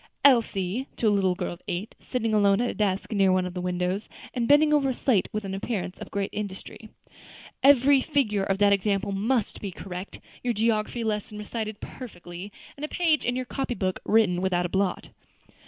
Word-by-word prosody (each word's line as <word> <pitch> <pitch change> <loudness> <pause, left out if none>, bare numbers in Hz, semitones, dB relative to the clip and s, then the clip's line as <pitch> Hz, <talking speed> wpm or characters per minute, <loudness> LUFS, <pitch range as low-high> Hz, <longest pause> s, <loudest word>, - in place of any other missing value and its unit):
Elsie," 230 -2 +3
to 230 - +1
a - - +5
little 190 -2 +2
girl 175 - -3
of 175 - -13
eight, 180 +5 -3
sitting 230 -3 -2
alone 200 -1 +4
at 245 0 +1
a - - -7
desk 200 -1 -1
near 195 -3 +3
one 185 0 +2
of 180 - -5
the 180 - -4
windows, 180 +3 -2 0.2
and 235 -2 -1
bending 300 +1 +5
over 280 -2 +3
a 255 - -1
slate 230 -9 +1
with 210 -1 -3
an 190 - -4
appearance 195 -2 -3
of - - -8
great 200 0 -2
industry, 210 +1 -6 0.7
"every 275 0 +6
figure 255 -9 +1
of 195 0 0
that 200 0 +5
example 200 0 0
must 215 +3 0
be 200 - -3
correct, 185 +1 -7 0.2
your 240 -2 0
geography 225 +1 0
lesson 210 -1 -2
recited 215 0 -5
perfectly, 185 -5 -9 0.2
and 280 - -10
a - - -1
page 320 -2 +1
in 245 - 0
your 255 0 -2
copybook 240 -8 -2
written 200 -5 +3
without 180 -2 +1
a - - -2
blot." 190 0 -1
210 Hz, 195 wpm, -26 LUFS, 190-245 Hz, 0.7 s, every